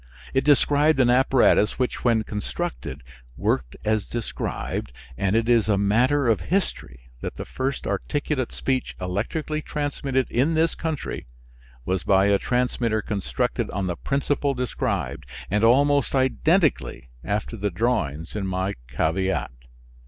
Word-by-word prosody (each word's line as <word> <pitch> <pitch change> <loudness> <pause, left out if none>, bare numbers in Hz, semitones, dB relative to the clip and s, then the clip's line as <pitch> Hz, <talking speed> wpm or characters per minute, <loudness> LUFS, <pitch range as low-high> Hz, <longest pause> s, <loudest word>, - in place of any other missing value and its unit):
It 135 - +2
described 145 +1 +4
an 125 -2 +5
apparatus 125 -4 +4
which, 125 -2 -2
when 115 -3 +3
constructed, 70 - -5 0.3
worked 60 -1 -1
as 110 -1 +1
described, 115 - -4 0.2
and 95 - 0
it 115 0 +2
is 115 -4 +3
a 100 - +3
matter 125 +8 +3
of 110 -6 +2
history 60 - -2
that - - -5
the - - -6
first 130 +1 -3
articulate 145 -4 -2
speech 130 -1 -2
electrically 120 - -2
transmitted 140 -3 -1
in 145 +7 +2
this 165 +1 +2
country 160 - -4 0.6
was 95 +3 0
by 95 +2 +4
a 100 -1 +3
transmitter 120 -3 0
constructed 100 -3 -2
on 100 - -2
the 90 -1 -2
principle 140 +4 0
described, 125 - -2 0.2
and 105 +2 +2
almost 140 +4 +4
identically 135 - +1
after 105 +3 -2
the 105 -1 -1
drawings 85 - -1
in 100 -2 -2
my 95 +1 -1
caveat. 80 +9 0
115 Hz, 135 wpm, -24 LUFS, 95-140 Hz, 0.6 s, an